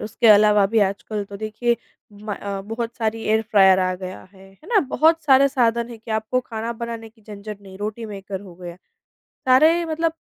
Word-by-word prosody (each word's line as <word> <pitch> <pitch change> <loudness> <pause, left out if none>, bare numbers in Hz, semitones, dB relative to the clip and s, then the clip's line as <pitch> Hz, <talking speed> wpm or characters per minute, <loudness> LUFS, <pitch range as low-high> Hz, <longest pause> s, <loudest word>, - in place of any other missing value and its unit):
उसके 215 +2 -1
अलावा 210 -1 +6
भी 220 +3 +1
आजकल 205 +1 -5
तो 200 0 -10
देखिए 220 +3 -1 0.4
म 205 0 -6
अ, 200 -1 -5
बहुत 230 +3 -5
सारी 225 -1 -2
एयर 220 +1 +1
फ्रायर 190 -2 +6
आ 185 0 0
गया 185 0 -8
है, 195 0 -17
है 195 - -19
ना? 440 -4 +4
बहुत 320 +3 +2
सारे 275 -1 +5
साधन 235 -3 +1
हैं 230 - -9
कि 225 - -12
आपको 220 +3 0
खाना 225 0 -4
बनाने 230 -1 -6
की 220 0 -27
झंझट 210 0 -9
नहीं, 190 -1 -13
रोटी 215 +2 -5
मेकर 195 -2 -7
हो 190 -4 -13
गया, 175 -1 -9 0.7
सारे 310 +7 +4
मतलब 325 0 -1
220 Hz, 200 wpm, -22 LUFS, 200-235 Hz, 0.7 s, अलावा